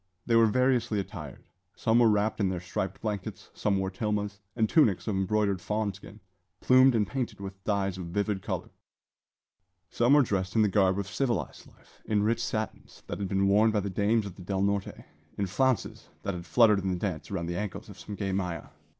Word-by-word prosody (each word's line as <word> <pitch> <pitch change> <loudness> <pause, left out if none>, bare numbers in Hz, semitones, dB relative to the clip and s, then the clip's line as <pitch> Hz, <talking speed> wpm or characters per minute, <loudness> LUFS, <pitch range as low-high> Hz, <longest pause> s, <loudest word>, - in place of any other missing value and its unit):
They 115 - +2
were 115 0 +6
variously 120 -2 +2
attired: 90 -8 -7 0.3
some 115 +1 +2
were 115 -2 +6
wrapped 105 +1 +1
in 100 -3 +2
their 90 -2 -2
striped 95 +2 -4
blankets; 105 -4 -5
some 100 -2 0
wore 95 0 -1
tilmas, 105 0 -2 0.2
and 110 -2 +2
tunics 115 - +3
of 105 - 0
embroidered 100 0 +1
fawn 105 0 -1
skin, 105 +2 -13 0.4
plumed 130 +2 +5
and 105 -2 +2
painted 120 -2 -4
with 95 0 -8
dyes 100 -3 0
of 90 - -5
vivid 100 +2 -1
colour; - - -4 1.2
some 120 +3 +3
were 145 -1 +7
dressed 95 -3 -2
in 110 - +5
the 105 - +3
garb 95 -1 +3
of 100 - -2
civilised 120 -1 -2
life - - -23
in 105 -1 +1
rich 115 +2 +1
satins, 110 -2 -5
that - - -5
had 100 - -2
been 95 +1 +2
worn 105 +3 +5
by 105 -1 +1
the 100 0 -4
dames 105 +3 +1
of 100 - -7
the - - -10
Del 95 +1 -1
Norte; 100 -1 -2 0.3
in 100 - 0
flounces 125 +3 -1
that 100 - -2
had 85 -1 -7
fluttered 105 +3 +5
in 95 0 -2
the 90 - 0
dance 90 -5 -4
around 95 -4 -3
the 85 +1 -3
ankles 105 -3 -5
of - - -12
some 105 - -7
gay 100 -1 -2
maja. 90 -3 -3
100 Hz, 210 wpm, -28 LUFS, 95-110 Hz, 1.2 s, were